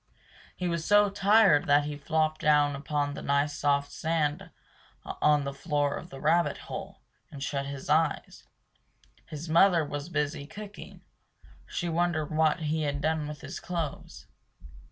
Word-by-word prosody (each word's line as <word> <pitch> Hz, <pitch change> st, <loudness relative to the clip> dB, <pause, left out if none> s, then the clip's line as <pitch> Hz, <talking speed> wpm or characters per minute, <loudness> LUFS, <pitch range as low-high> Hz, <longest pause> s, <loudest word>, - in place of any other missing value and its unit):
He 180 Hz, -, -3 dB
was 170 Hz, -2 st, -2 dB
so 205 Hz, +2 st, +4 dB
tired 200 Hz, -5 st, +4 dB
that 145 Hz, 0 st, +5 dB
he 150 Hz, 0 st, -4 dB
flopped 155 Hz, +1 st, -1 dB
down 145 Hz, -1 st, +3 dB
upon 145 Hz, 0 st, -2 dB
the -, -, -7 dB
nice 140 Hz, +1 st, 0 dB
soft 140 Hz, -1 st, 0 dB
sand 155 Hz, -2 st, -1 dB, 0.6 s
on 150 Hz, -1 st, +2 dB
the 140 Hz, 0 st, -4 dB
floor 145 Hz, 0 st, -1 dB
of 175 Hz, -, -8 dB
the 135 Hz, -, -10 dB
rabbit 170 Hz, +4 st, +2 dB
hole, -, -, -8 dB, 0.3 s
and 140 Hz, -2 st, -8 dB
shut 140 Hz, 0 st, -2 dB
his 140 Hz, -1 st, -7 dB
eyes. 155 Hz, +3 st, 0 dB, 0.8 s
His 155 Hz, +1 st, -7 dB
mother 170 Hz, 0 st, +4 dB
was 145 Hz, +2 st, -5 dB
busy 150 Hz, -2 st, -2 dB
cooking; 205 Hz, +3 st, -10 dB, 0.6 s
she 175 Hz, -, -3 dB
wondered 165 Hz, -2 st, 0 dB
what 160 Hz, +2 st, +2 dB
he 155 Hz, +1 st, -1 dB
had 145 Hz, -1 st, -1 dB
done 155 Hz, 0 st, -1 dB
with 150 Hz, -1 st, -8 dB
his -, -, -7 dB
clothes. 160 Hz, -, -5 dB
150 Hz, 155 wpm, -28 LUFS, 145-165 Hz, 0.8 s, that